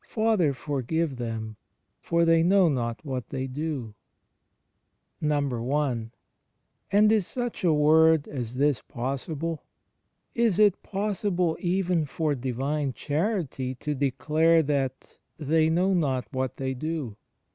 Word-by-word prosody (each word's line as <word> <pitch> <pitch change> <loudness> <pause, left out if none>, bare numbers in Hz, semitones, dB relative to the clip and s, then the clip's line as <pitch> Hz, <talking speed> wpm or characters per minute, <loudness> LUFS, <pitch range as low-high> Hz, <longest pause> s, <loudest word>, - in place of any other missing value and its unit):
^^ - - -36
Father, 215 -9 +1
jor 140 +1 -3
give 160 +2 -1
them, 110 -2 -5 0.4
for 170 0 +2
they 165 0 +4
know 185 +2 +4
not 120 -3 -2
what 130 -4 -4
they 130 0 -3
doJ^ 135 -5 -4 1.3
I. 140 -4 0 0.8
And 210 +2 +5
is 215 -5 +2
such 245 -4 -4
a 175 - +4
word 155 +1 +4
as 125 -4 -5
this 140 0 +2
possible? 145 +6 -4 0.7
Is 230 -6 +2
it 210 -3 +4
possible 195 -4 -1
even 180 -2 0
for 150 +1 -1
Divine 135 +2 -2
Charity 150 - -2
to 150 +4 -3
declare 150 +4 +2
that 135 -3 -3 0.2
"they 155 +1 +2
know 180 +4 +2
not 135 -8 0
what 130 0 -2
they 130 -1 -2
do"? 150 -4 -4
150 Hz, 125 wpm, -26 LUFS, 130-170 Hz, 1.3 s, And